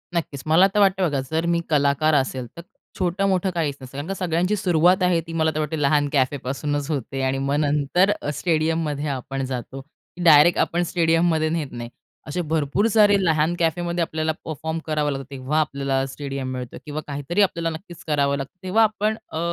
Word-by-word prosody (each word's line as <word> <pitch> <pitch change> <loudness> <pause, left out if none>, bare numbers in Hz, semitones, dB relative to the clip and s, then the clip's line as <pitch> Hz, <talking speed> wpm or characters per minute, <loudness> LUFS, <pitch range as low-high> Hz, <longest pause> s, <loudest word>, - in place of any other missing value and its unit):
नक्कीच. 145 -5 -3
मला 165 +5 +5
तर 210 - +2
वाटतं 195 -2 +3
बघा 140 - -1
जर 160 +1 0
मी - - +1
कलाकार 150 +1 +2
असेल, 130 -2 0
तर - - -6 0.4
छोटं-मोठं 190 +1 +1
काहीच 150 -4 -1
नसतं. 130 - -10
कारण 145 +3 -5
का 195 - -2
सगळ्यांची 180 +2 0
सुरुवात 180 0 +3
आहे 180 -2 +3
ती 165 - -7
मला 160 0 +2
तर - - -1
वाटते 155 0 -2
लहान 145 +1 +3
कॅफेपासूनच 140 +2 -1
होते 135 -1 -3
आणि 130 0 0
मग 135 +1 -1
नंतर 150 +6 +2
अ, - - -3
स्टेडियममध्ये 155 -2 0
आपण 135 0 -4
जातो 130 +1 -5
की 170 +4 -12
डायरेक्ट 160 +1 +6
आपण 175 +1 +1
स्टेडियममध्ये 165 -2 +2
नेत 155 -4 -2
नाही. 120 -1 -7 0.4
असे 180 +4 -2
भरपूर 160 +5 0
सारे 210 -2 +6
लहान 160 0 +2
कॅफेमध्ये 170 +1 0
आपल्याला 160 -1 -1
परफॉर्म 160 +1 -4
करावं 150 -2 0
लागतं. 135 -1 -5
तेव्हा 135 +3 -1
आपल्याला 140 -2 0
स्टेडियम 135 -1 -5
मिळतं 125 -1 -6
किंवा 150 0 -4
काहीतरी 145 +7 -1
आपल्याला 170 -4 +1
नक्कीच 170 -1 -12
करावं 140 -2 +1
लागतं. 135 0 -6
तेव्हा 205 +5 +3
आपण 215 0 +1 0.2
अ, 160 - -4
155 Hz, 185 wpm, -23 LUFS, 140-175 Hz, 0.4 s, डायरेक्ट